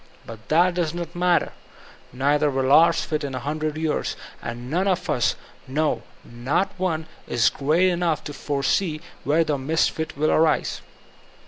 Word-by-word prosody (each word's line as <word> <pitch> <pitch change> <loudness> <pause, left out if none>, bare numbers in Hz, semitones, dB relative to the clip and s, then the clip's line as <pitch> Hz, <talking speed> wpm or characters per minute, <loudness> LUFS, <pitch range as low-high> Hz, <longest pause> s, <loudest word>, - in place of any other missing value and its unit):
But 110 -1 -11
that 175 +3 +4
does 170 -2 -1
not 170 -2 -5
matter. 175 0 +2 0.6
Neither 145 +4 +2
wiD 135 -1 0
ours 160 +4 +6
fit 155 -1 -2
in 135 -2 -4
a - - -2
hundred 155 +3 -3
years, 160 -1 -1 0.3
and 120 +1 -6
none 180 +8 0
of 185 -1 0
us, 120 - +1 0.3
no, 145 -3 0 0.2
not 130 +11 -1
one, 165 -4 -1 0.2
b - - -3 0.2
great 160 +7 +2
enough 170 -3 0
to 145 - -6
foresee 145 +4 -1 0.2
where 155 +4 +3
the 150 -3 -1
misfit 160 +2 -1
will 155 +2 +2
arise. 160 0 +2
155 Hz, 155 wpm, -23 LUFS, 140-170 Hz, 0.6 s, ours